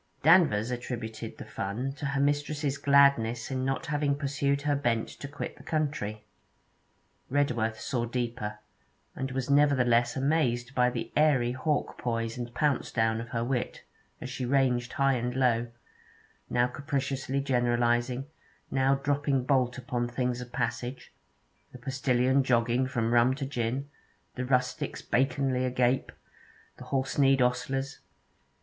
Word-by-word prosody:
Danvers 140 - +5
attributed 120 -2 -5
the - - -8
fun 115 +8 -3
to 145 +1 -4
her 140 0 -1
mistress's 145 0 0
gladness 140 -5 +4
in 130 -1 -1
not 135 +5 -1
having 145 -2 0
pursued 140 0 -1
her 145 -1 +2
bent 120 -5 0
to 140 - -8
quit 145 +2 -6
the - - -13
country. 140 -9 -2 1.1
Redworth 120 -6 0
saw 120 -3 -2
deeper, 120 -3 -3 0.6
and 135 0 -3
was 130 -1 -2
nevertheless 125 -5 +4
amazed 130 -3 +1
by 125 -1 +3
the 120 -2 -5
airy 140 -6 +3
hawk 145 +4 -1
poise 115 -1 -2
and 120 -1 -5
pounce 145 -2 +1
down 110 -1 +1
of 115 - -8
her 115 0 -1
wit, 125 0 -2 0.4
as 125 - -6
she 130 - -4
ranged 125 -1 +1
high 135 0 +3
and 125 0 -2
low, 120 -3 +2 0.8
now 120 0 +3
capriciously 135 +1 -2
generalizing, 120 -1 +1 0.5
now 135 +1 +3
dropping 140 -1 0
bolt 130 -2 +1
upon 125 -1 -2
things 125 0 -2
of 125 -1 -9
passage 120 +1 -3 0.6
the - - -8
postillion 130 0 +1
jogging 120 0 +2
from 115 -2 -1
rum 120 +2 +4
to 140 -1 -4
gin, 130 +1 -2 0.5
the 130 - -3
rustics 125 0 -1
baconly 130 0 +1
agape, 125 0 +1 0.7
the - - -10
horse 135 +1 -1
kneed 135 -1 +5
ostlers. 135 +2 0
130 Hz, 140 wpm, -29 LUFS, 120-140 Hz, 1.1 s, Danvers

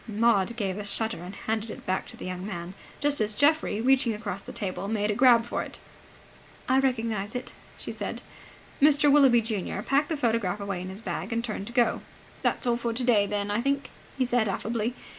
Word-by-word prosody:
Maud 220 -1 +2
gave 200 -3 -2
a - - -4
shudder 220 -1 -2
and 180 +3 -8
handed 220 0 -3
it - - -9
back 185 0 -1
to - - -7
the - - -8
young 185 0 -5
man, 180 -3 -5 0.3
just 290 -3 +2
as 210 0 0
Geoffrey, 290 -5 +2
reaching 255 -2 +3
across 205 -2 -4
the 255 - -9
table, 200 -5 -4
made 210 -1 0
a - - +1
grab 240 0 +5
for - - -2
it. - - -7 0.9
"I 260 +1 +4
recognize 225 -5 -1
it," 250 - -5 0.2
she - - -6
said. - - -5 0.6
Mr. 290 0 +6
Willoughby 270 -5 +6
junior 210 -3 -3
packed 280 +2 +2
the 320 - -1
photograph 225 -6 0
away 200 -3 -3
in 185 - -6
his 190 +3 -9
bag, - - -4
and 230 0 -1
turned 210 -4 -4
to 235 - -8
go. 240 -2 +2 0.4
"That's - - 0
all 240 -1 +2
for 235 -1 -2
today, 230 -4 +3
then, 205 0 -2
I 210 +3 +1
think," 275 +1 -1 0.3
he 260 - +2
said, 245 -3 +2
affably. 225 +4 -2
225 Hz, 210 wpm, -27 LUFS, 205-250 Hz, 0.9 s, Mr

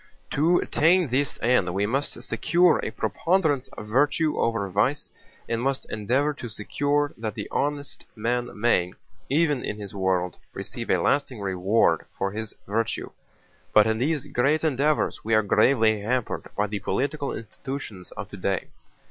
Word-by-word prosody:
"To 165 +5 +3
attain 170 0 +3
this 135 +3 +1
end 115 -7 +3
we 100 +1 +1
must 135 +7 -2
secure 175 0 +3
a - - -2
preponderance 145 - 0
of 105 - -7
virtue 145 +6 +2
over 115 -4 0
vice 105 +10 0 0.4
and 115 0 -1
must 135 +1 -1
endeavor 130 +8 +1
to 125 -5 -7
secure 145 +7 0
that 110 -2 -3
the 105 -2 -5
honest 145 0 -2
man 120 +2 -1
may, 90 -6 +2 0.4
even 150 -2 +2
in 105 - -3
this 100 -2 -7
world, 95 -2 0 0.2
receive - - -6
a - - +4
lasting 140 -5 +1
reward 95 +2 +1
for 95 0 -1
his 110 +1 -5
virtue. 110 +3 -2 0.6
But 105 - +8
in 110 0 0
these 145 +1 0
great 145 +6 +1
endeavors 150 0 +1
we 115 +1 +2
are 110 - +4
gravely 110 0 +3
hampered 125 +3 -2
by 105 - +2
the 105 0 -3
political 140 +5 -1
institutions 115 -4 -7
of 105 - -6
today. 100 -2 -2
120 Hz, 155 wpm, -25 LUFS, 105-145 Hz, 0.6 s, But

